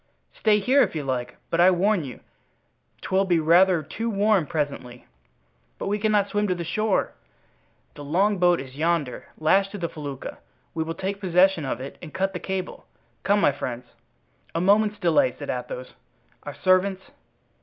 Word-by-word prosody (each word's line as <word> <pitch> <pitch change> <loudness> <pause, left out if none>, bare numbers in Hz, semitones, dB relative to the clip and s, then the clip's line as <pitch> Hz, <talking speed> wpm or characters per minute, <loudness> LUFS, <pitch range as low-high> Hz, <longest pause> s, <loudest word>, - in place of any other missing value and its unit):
"Stay 215 -1 +3
here, 260 +7 +3
if - - +1
you 150 - -2
like, 125 -2 -3
but 165 - 0
I 180 - +7
warn 190 0 +2
you 130 -4 -9 0.8
'twill 190 +1 +1
be 175 -3 +2
rather 170 +1 +4
too 225 +10 -4
warm 205 -5 +2
presently." 140 -5 -4 0.7
"But - - -4
we 205 +1 0
cannot 210 -1 +2
swim 205 0 0
to 180 - 0
the 175 - -4
shore." 215 +4 0 0.8
"The 145 - -10
longboat 180 +2 +2
is 130 -1 -9
yonder, 155 -4 -1
lashed 195 +5 +3
to - - -4
the 170 -3 -2
felucca. 145 -4 -7 0.3
We 160 - -1
will 165 +1 -5
take 195 +3 -4
possession 180 -3 +3
of 130 - -3
it 135 +2 -8
and 165 - -9
cut 195 +1 0
the 180 - -4
cable. 190 0 -5 0.3
Come, 205 +1 +2
my 145 - +4
friends." 125 -3 -5 0.7
"A - - +1
moment's 210 +3 +3
delay," 195 - +2
said - - -4
Athos; - - -6 0.5
"our - - -8
servants?" 185 +1 +2
180 Hz, 170 wpm, -24 LUFS, 155-200 Hz, 0.8 s, I